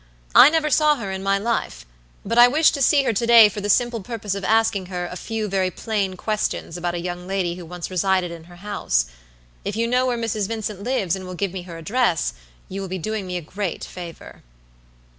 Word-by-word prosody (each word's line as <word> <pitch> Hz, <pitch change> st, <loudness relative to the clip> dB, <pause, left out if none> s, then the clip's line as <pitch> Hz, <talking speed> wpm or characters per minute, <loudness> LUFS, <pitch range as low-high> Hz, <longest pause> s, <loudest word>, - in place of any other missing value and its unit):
I 270 Hz, -, +9 dB
never 310 Hz, -1 st, +1 dB
saw 300 Hz, +1 st, +4 dB
her 205 Hz, -8 st, -5 dB
in 190 Hz, 0 st, -4 dB
my 195 Hz, 0 st, +2 dB
life; 200 Hz, -, -2 dB, 0.4 s
but 235 Hz, -, +1 dB
I 240 Hz, -, +10 dB
wish 305 Hz, +5 st, +4 dB
to 280 Hz, -, -3 dB
see 280 Hz, +1 st, +4 dB
her 235 Hz, -, +1 dB
to 230 Hz, +3 st, -1 dB
day 230 Hz, -3 st, +9 dB
for 205 Hz, -, -6 dB
the 205 Hz, -, -3 dB
simple 240 Hz, +2 st, +2 dB
purpose 210 Hz, -1 st, -4 dB
of 200 Hz, 0 st, -5 dB
asking 220 Hz, -2 st, +2 dB
her 180 Hz, -1 st, -4 dB
a 180 Hz, -, -7 dB
few 220 Hz, +2 st, -3 dB
very 190 Hz, -2 st, 0 dB
plain 200 Hz, -1 st, -2 dB
questions 215 Hz, -4 st, -2 dB
about 175 Hz, 0 st, -2 dB
a -, -, -2 dB
young 175 Hz, +1 st, -5 dB
lady 190 Hz, -3 st, -1 dB
who 175 Hz, -1 st, -9 dB
once 180 Hz, +1 st, -6 dB
resided 185 Hz, -1 st, +1 dB
in 165 Hz, -1 st, -10 dB
her 175 Hz, +1 st, -15 dB
house. 175 Hz, -, -1 dB, 0.6 s
If 205 Hz, -, -3 dB
you 230 Hz, +1 st, +1 dB
know 250 Hz, +2 st, +2 dB
where 245 Hz, -1 st, 0 dB
Mrs. 220 Hz, -3 st, -1 dB
Vincent 215 Hz, -3 st, -4 dB
lives 200 Hz, -7 st, 0 dB
and 185 Hz, -1 st, -8 dB
will 185 Hz, -, -6 dB
give 195 Hz, 0 st, -2 dB
me 190 Hz, -, -4 dB
her 165 Hz, -, -7 dB
address, 180 Hz, -, 0 dB, 0.3 s
you 195 Hz, +1 st, -5 dB
will 195 Hz, -, -4 dB
be 185 Hz, +1 st, -4 dB
doing 210 Hz, +2 st, -4 dB
me 180 Hz, 0 st, -3 dB
a -, -, -4 dB
great 185 Hz, +2 st, -4 dB
favor." 175 Hz, -2 st, -9 dB
195 Hz, 230 wpm, -22 LUFS, 180-230 Hz, 0.6 s, I